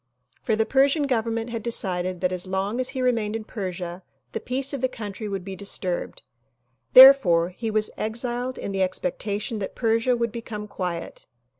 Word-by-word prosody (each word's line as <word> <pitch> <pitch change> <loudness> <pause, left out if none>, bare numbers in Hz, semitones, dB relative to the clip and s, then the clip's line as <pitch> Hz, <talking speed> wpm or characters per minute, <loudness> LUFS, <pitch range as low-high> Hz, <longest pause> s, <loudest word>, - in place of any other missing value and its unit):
For 220 - +1
the 220 0 +1
Persian 280 +4 +3
Government 230 -2 -1
had 230 -1 -3
decided 185 -5 -1
that 180 -1 +1
as 185 0 -1
long 195 +5 -2
as 255 0 0
he 260 -1 -3
remained 225 -4 0
in 225 - -4
Persia 185 -4 -5 0.3
the - - -3
peace 270 +3 -2
of 275 - -3
the 260 - +2
country 210 -3 -6
would 195 -2 -4
be 195 -1 -6
disturbed; 185 -2 -4 0.7
therefore 250 -11 +8
he 220 +5 -5
was 215 0 +1
exiled 240 +3 -2
in - - -5
the 195 -1 -1
expectation 200 +4 -2
that 195 - -5
Persia 230 +1 +1
would 235 -1 -1
become 215 -2 -6
quiet. 180 -4 -5
215 Hz, 175 wpm, -24 LUFS, 190-240 Hz, 0.7 s, therefore